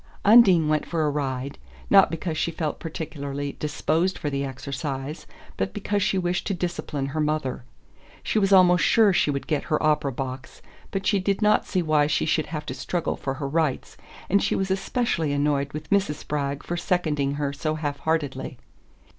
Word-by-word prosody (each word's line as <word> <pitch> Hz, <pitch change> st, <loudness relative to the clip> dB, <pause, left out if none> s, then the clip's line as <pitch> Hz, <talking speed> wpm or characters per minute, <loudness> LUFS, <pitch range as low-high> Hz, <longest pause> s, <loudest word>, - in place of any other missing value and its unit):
Undine 200 Hz, -7 st, +7 dB
went 155 Hz, 0 st, +1 dB
for 165 Hz, -2 st, -1 dB
a 150 Hz, -, +1 dB
ride, 135 Hz, -1 st, -3 dB, 0.3 s
not 195 Hz, -1 st, +7 dB
because 165 Hz, 0 st, -3 dB
she 155 Hz, -, 0 dB
felt 160 Hz, -2 st, -3 dB
particularly 145 Hz, -3 st, -5 dB
disposed 160 Hz, +4 st, 0 dB
for 145 Hz, -, -3 dB
the 140 Hz, 0 st, -1 dB
exercise, 135 Hz, +2 st, -5 dB, 0.3 s
but -, -, -2 dB
because 205 Hz, 0 st, -1 dB
she 195 Hz, -, +1 dB
wished 175 Hz, -1 st, -1 dB
to 195 Hz, -, 0 dB
discipline 170 Hz, -5 st, -3 dB
her 140 Hz, +3 st, -4 dB
mother. 150 Hz, -5 st, -1 dB, 0.6 s
She 220 Hz, -, +1 dB
was 195 Hz, -1 st, +1 dB
almost 180 Hz, -2 st, +6 dB
sure 215 Hz, -4 st, +5 dB
she 165 Hz, -, +2 dB
would 140 Hz, -1 st, -2 dB
get 150 Hz, -3 st, -1 dB
her 155 Hz, +1 st, 0 dB
opera 150 Hz, -2 st, +2 dB
box, 130 Hz, +1 st, -6 dB, 0.3 s
but 195 Hz, -1 st, -3 dB
she 200 Hz, 0 st, +3 dB
did 195 Hz, +2 st, 0 dB
not 210 Hz, -, +3 dB
see 185 Hz, -3 st, 0 dB
why 155 Hz, -2 st, +3 dB
she 150 Hz, -, +1 dB
should 155 Hz, 0 st, +1 dB
have 150 Hz, -2 st, -5 dB
to 130 Hz, -, -4 dB
struggle 150 Hz, +6 st, -2 dB
for 135 Hz, -1 st, -4 dB
her 140 Hz, 0 st, -4 dB
rights, 155 Hz, -2 st, -1 dB, 0.3 s
and 200 Hz, +1 st, +3 dB
she -, -, +1 dB
was 190 Hz, 0 st, -1 dB
especially 190 Hz, -, 0 dB
annoyed 145 Hz, -1 st, 0 dB
with 150 Hz, +5 st, -8 dB
Mrs. 195 Hz, -6 st, +2 dB
Spragg 145 Hz, -1 st, -3 dB
for 175 Hz, -, -3 dB
seconding 150 Hz, -6 st, 0 dB
her 145 Hz, -1 st, -2 dB
so 155 Hz, +2 st, -2 dB
half 145 Hz, -2 st, -3 dB
heartedly. 145 Hz, -5 st, -2 dB
155 Hz, 190 wpm, -25 LUFS, 140-180 Hz, 0.6 s, Undine